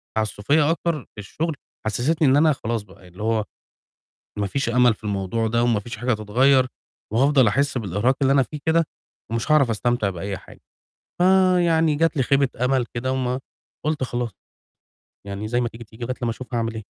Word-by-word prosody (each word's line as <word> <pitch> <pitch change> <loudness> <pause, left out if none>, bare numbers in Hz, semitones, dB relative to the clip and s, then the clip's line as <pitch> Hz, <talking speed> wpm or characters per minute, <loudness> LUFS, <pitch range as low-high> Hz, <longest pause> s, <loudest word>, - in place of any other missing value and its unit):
تعسّفيّة 110 +8 +1
أكتر 170 -1 0 0.2
في - - -10
الشُغل، 155 - -3 0.3
حسّستني 140 +8 +1
إن 135 +2 +5
أنا 155 0 +5
خلاص 115 -3 -3
بقى 95 -1 -18
ي - - -14
اللي 90 +4 -9
هو 110 -1 +1 0.9
ما 100 - 0
فيش 135 +5 -1
أمل 125 -1 +4
في 105 - -22
الموضوع 105 +2 -1
ده 115 +1 +1
وما 115 -4 +2
فيش 115 +1 -7
حاجة 120 +3 0
هتتغيّر، 130 +5 +3 0.5
وهافضل 135 0 +4
أحِس 140 +3 +1
بالإرهاق 110 +5 0
اللي 135 0 +4
أنا 135 -1 +5
فيه 150 +3 -6
كده، 165 +1 +4 0.5
ومش 115 +5 -2
هاعرف 140 -6 +4
أستمتع 115 -1 0
بأي 95 +2 -4
حاجة، - - -16 0.6
فيعني 175 -4 +4
جات 165 -1 +1
لي 130 - +3
خيبة 140 0 +2 0.2
أمل 130 -2 +2
كده 130 +2 -2
وما 130 0 -1 0.5
قُلت 155 -3 0
خلاص، 120 -2 -2 1.0
يعني 100 +2 -5
زي 120 +1 +1
ما 120 - 0
تيجي، 115 +1 -11
تيجي 110 +3 -9
لغاية 130 +1 -3
لمّا 120 - +1
أشوف 125 +2 -7
هاعمل 115 -1 -1
إيه. - - -9
120 Hz, 190 wpm, -23 LUFS, 110-140 Hz, 1.0 s, إن